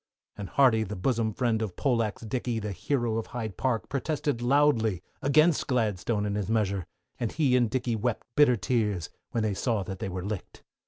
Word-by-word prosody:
And 100 -2 -6
Hardy 125 -5 +4
the 105 -1 -3
bosom 110 +3 0
friend 115 0 0
of 105 -5 -3
Poleaxe 115 -6 0
Dickey 120 +1 -2
the 105 -1 -3
hero 115 - -1
of 115 - -6
Hyde 110 -5 -5
Park, 125 -1 -1
protested 140 -2 -1
loudly 120 - +3 0.2
against 155 +3 +3
Gladstone 110 -3 0
and 100 0 -1
his 105 -1 -2
measure, 100 -5 0 0.3
and 120 -3 -1
he 140 -5 +2
and 120 -3 +3
Dizzey 120 -1 -1
wept 115 +2 -2
bitter 145 -4 +6
tears, 105 -5 -1 0.2
when 115 - -1
they 105 -2 0
saw 110 0 0
that 95 0 -6
they - - -3
were 90 0 -4
licked. 105 -2 -6
115 Hz, 190 wpm, -28 LUFS, 105-125 Hz, 0.3 s, bitter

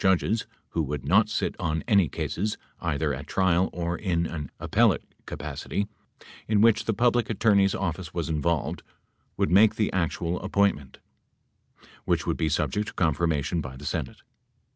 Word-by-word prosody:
100 95 +4 +2 1.4
any 100 - +4
cases, 105 +9 -2 0.2
either 75 -2 -1
at 65 +1 -6
trial 95 -1 +2
or 85 0 -2
in 85 -2 0
an 75 -4 -5
appellate - - +2 0.2
capacity, 100 0 -4 0.6
in 105 -1 +2
which 115 +1 +4
the 115 - +1
Public 120 0 +2
Attorney's 100 -3 +3
office 85 -3 -3
was 85 -1 -3
involved 80 0 -1 0.3
— - - -44
would - - +1
make 100 +4 +6
the 105 - 0
actual 85 -1 -1
appointment, 100 -10 0 1.1
which - - +1
would - - 0
be 80 - 0
subject 75 +8 0
to - - -7
confirmation 80 -1 +1
by 65 -2 -7
the 70 - -10
Senate. 75 -2 -4
85 Hz, 140 wpm, -26 LUFS, 80-100 Hz, 1.4 s, make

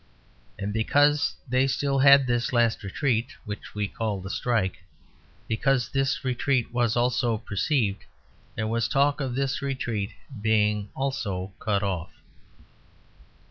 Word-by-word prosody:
And 100 +1 -3
because 145 +6 +3
they 130 +2 +2
still 135 0 0
had 140 0 +7
this 120 +3 0
last 120 -2 +2
retreat 120 +5 -1
(which 105 -1 -7
we 105 -1 -1
call 105 -1 -3
the 95 +1 -6
Strike), 110 -7 0 0.7
because 125 +1 +1
this 135 +1 0
retreat 125 -1 0
was 120 -1 +1
also 120 -1 +1
perceived, 105 - -1 0.5
there 110 - -2
was 115 0 0
talk 140 +1 +2
of 130 -3 -2
this 135 0 -1
retreat 120 -7 -2 0.3
being 105 -1 +1
also 105 -9 -3
cut 100 -2 0
off. 90 -4 -2
120 Hz, 130 wpm, -26 LUFS, 105-135 Hz, 0.7 s, had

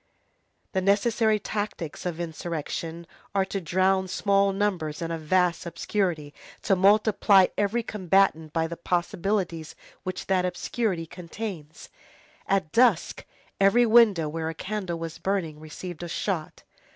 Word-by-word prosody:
The 190 - 0
necessary 215 +3 +2
tactics 205 -6 -4
of 170 -1 -4
insurrection 165 0 -4 0.3
are 195 -1 +3
to 195 0 -4
drown 190 +3 +2
small 200 +1 +2
numbers 190 -7 -1
in 165 0 -3
a 165 - -3
vast 175 +2 +1
obscurity, 170 -3 -2 0.3
to 195 - +3
multiply 200 0 +5
every 210 +3 0
combatant 190 -6 +1
by 160 0 0
the 165 +1 -6
possibilities 175 -1 -2 0.3
which 185 0 -5
that 185 -1 +2
obscurity 180 0 -2
contains. 170 -2 -8 0.6
At 190 -5 0
dusk, 230 -7 +2 0.3
every 200 +5 +5
window 220 -8 +5
where 160 +1 -3
a 165 - -6
candle 185 0 -4
was 165 0 -6
burning 170 -5 -2
received 155 +2 -8
a 175 - -5
shot. 165 -2 -3
185 Hz, 130 wpm, -26 LUFS, 165-200 Hz, 0.6 s, multiply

